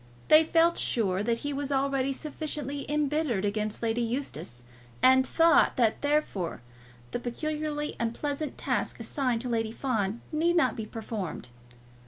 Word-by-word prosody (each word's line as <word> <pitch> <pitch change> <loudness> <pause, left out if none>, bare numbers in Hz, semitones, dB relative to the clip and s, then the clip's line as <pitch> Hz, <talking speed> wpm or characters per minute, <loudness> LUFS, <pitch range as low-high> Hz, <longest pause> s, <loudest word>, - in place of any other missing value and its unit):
They 310 +1 +8
felt 330 +1 +3
sure 195 -5 0
that 230 +2 +1
he 290 - -1
was 280 0 -3
already 275 0 +1
sufficiently 290 -1 -4
embittered 295 -8 +1
against 210 +2 -2
Lady 230 +1 +1
Eustace, 230 - -4 0.4
and 260 0 +6
thought 330 0 +4
that 230 -3 +2
therefore 285 - -1 0.5
the - - -2
peculiarly 300 +4 -3
unpleasant 285 +6 -2
task - - -1
assigned 250 -6 -1
to 250 - -4
Lady 225 -2 0
Fawn 225 -4 -1
need 335 +3 +2
not 260 -9 +3
be 220 -1 -5
performed. 215 - -5
260 Hz, 140 wpm, -28 LUFS, 225-295 Hz, 0.5 s, They